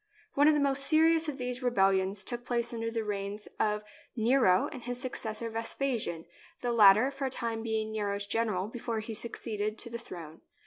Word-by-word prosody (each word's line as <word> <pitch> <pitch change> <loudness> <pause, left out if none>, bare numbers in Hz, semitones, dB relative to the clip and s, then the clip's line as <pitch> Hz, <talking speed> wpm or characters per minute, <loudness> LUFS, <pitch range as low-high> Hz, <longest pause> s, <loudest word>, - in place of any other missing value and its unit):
One 290 +1 +4
of 310 - +6
the - - +2
most 275 -1 +2
serious 320 0 +4
of 280 - -5
these 250 0 -4
rebellions 195 -4 +2
took 240 0 -4
place 240 -1 -1
during 230 -1 -3
the 225 -1 -2
reigns 205 0 -4
of 210 0 +1 0.3
Nero 225 -5 +4
and 255 - -8
his 245 +1 -4
successor, 230 -3 -3
Vespasian, 225 -6 -2 0.4
the 245 - 0
latter 220 +3 +6
for 275 0 -4
a - - 0
time 230 -3 -3
being 220 -1 -2
Nero's 205 -2 -2
gen 225 +3 0
eral 200 +1 -2
before 230 -2 -3
he 220 +1 -6
succeeded 215 -1 -3
to 235 - -7
the 235 - -4
throne. 165 -8 -9
230 Hz, 190 wpm, -30 LUFS, 210-250 Hz, 0.4 s, of